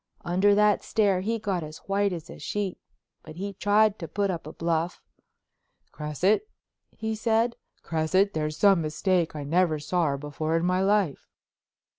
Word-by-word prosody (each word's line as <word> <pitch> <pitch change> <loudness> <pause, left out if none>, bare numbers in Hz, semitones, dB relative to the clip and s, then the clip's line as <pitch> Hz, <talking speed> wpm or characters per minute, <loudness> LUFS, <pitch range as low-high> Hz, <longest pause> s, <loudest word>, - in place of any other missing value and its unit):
Under 190 +4 +3
that 210 0 +3
stare 200 -4 +2
he 225 +4 -1
got 200 -5 -2
as 155 0 -8
white 200 0 +1
as 170 -3 -6
a - - -11
sheet, 205 -3 -3 0.4
but 155 - -11
he 200 +3 -5
tried 205 +2 +3
to 165 - -5
put 200 +1 -1
up 165 -4 -5
a - - -6
bluff. 165 +1 -1 0.9
"Cresset," 160 - 0 0.5
he 220 0 -2
said, 225 +2 +1 0.3
"Cresset? 175 +5 +1
There's 155 -1 -2
some 195 -4 +5
mistake. 165 +2 0
I 150 - -4
never 165 +2 +2
saw 165 +3 0
her 140 -1 -1
before 155 +3 -2
in 165 - 0
my 180 +1 +2
life." 195 -6 +1
185 Hz, 165 wpm, -26 LUFS, 160-205 Hz, 0.9 s, some